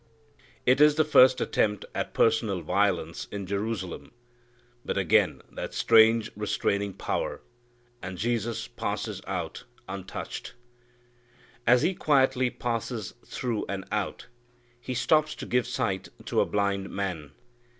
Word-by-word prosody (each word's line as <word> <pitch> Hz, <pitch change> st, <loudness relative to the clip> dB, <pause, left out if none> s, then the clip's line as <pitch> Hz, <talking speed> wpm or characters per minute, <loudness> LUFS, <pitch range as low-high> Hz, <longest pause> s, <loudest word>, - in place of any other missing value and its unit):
It 130 Hz, +3 st, +4 dB
is 150 Hz, 0 st, +7 dB
the 155 Hz, 0 st, +3 dB
first 130 Hz, -4 st, +6 dB
attempt 105 Hz, -2 st, 0 dB
at -, -, -3 dB
personal 110 Hz, -5 st, +2 dB
violence 90 Hz, -5 st, 0 dB
in 100 Hz, -1 st, -4 dB
Jerusalem. 100 Hz, -1 st, -4 dB, 0.7 s
But -, -, -3 dB
again 95 Hz, -4 st, +2 dB
that -, -, -6 dB
strange 110 Hz, 0 st, +5 dB
restraining 100 Hz, -1 st, -1 dB
power, -, -, -2 dB, 0.6 s
and 95 Hz, -1 st, -6 dB
Jesus 115 Hz, +1 st, -1 dB
passes -, -, -4 dB
out -, -, -4 dB, 0.2 s
untouched. 95 Hz, +3 st, -6 dB, 1.1 s
As 125 Hz, +1 st, +6 dB
he 190 Hz, -, +2 dB
quietly 130 Hz, -6 st, +3 dB
passes 115 Hz, -3 st, -3 dB
through 120 Hz, -4 st, -3 dB
and 95 Hz, -1 st, -4 dB
out, 105 Hz, -2 st, -2 dB, 0.5 s
He 125 Hz, +1 st, -5 dB
stops 155 Hz, +5 st, +2 dB
to -, -, -7 dB
give 125 Hz, 0 st, +1 dB
sight 95 Hz, -4 st, -2 dB, 0.2 s
to -, -, +2 dB
a -, -, +1 dB
blind 100 Hz, -1 st, 0 dB
man. 90 Hz, -8 st, -4 dB
110 Hz, 125 wpm, -27 LUFS, 100-125 Hz, 1.1 s, is